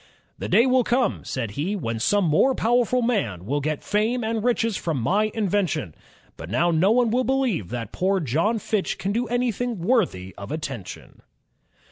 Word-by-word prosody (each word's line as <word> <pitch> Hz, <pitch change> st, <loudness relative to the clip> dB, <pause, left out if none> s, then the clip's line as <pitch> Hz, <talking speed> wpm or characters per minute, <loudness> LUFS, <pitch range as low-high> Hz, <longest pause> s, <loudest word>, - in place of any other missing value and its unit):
"The -, -, -4 dB
day 235 Hz, -, +5 dB
will 255 Hz, -1 st, +3 dB
come," 250 Hz, +2 st, 0 dB
said 115 Hz, -5 st, -4 dB
he, 160 Hz, -, -2 dB
"when 115 Hz, -, -3 dB
some 205 Hz, -, +2 dB
more 180 Hz, -, +3 dB
powerful 245 Hz, +2 st, +2 dB
man 120 Hz, -, -1 dB
will 145 Hz, +6 st, -1 dB
get 155 Hz, +1 st, -2 dB
fame 220 Hz, +4 st, 0 dB
and 220 Hz, -1 st, -1 dB
riches 230 Hz, -3 st, +1 dB
from 160 Hz, -7 st, -2 dB
my 205 Hz, -, +1 dB
invention; 190 Hz, -, -1 dB, 0.4 s
but 80 Hz, -, -8 dB
now 170 Hz, -, +2 dB
no 170 Hz, +4 st, +3 dB
one 235 Hz, 0 st, +3 dB
will 250 Hz, +2 st, +2 dB
believe 255 Hz, -, 0 dB
that 115 Hz, 0 st, -5 dB
poor 190 Hz, +1 st, +1 dB
John 165 Hz, -, 0 dB
Fitch 210 Hz, -1 st, -2 dB
can 195 Hz, -, -2 dB
do 235 Hz, +3 st, -1 dB
anything 245 Hz, 0 st, -1 dB
worthy 170 Hz, -, 0 dB
of 100 Hz, +1 st, -7 dB
attention." 135 Hz, -, -7 dB
200 Hz, 175 wpm, -24 LUFS, 145-235 Hz, 0.4 s, day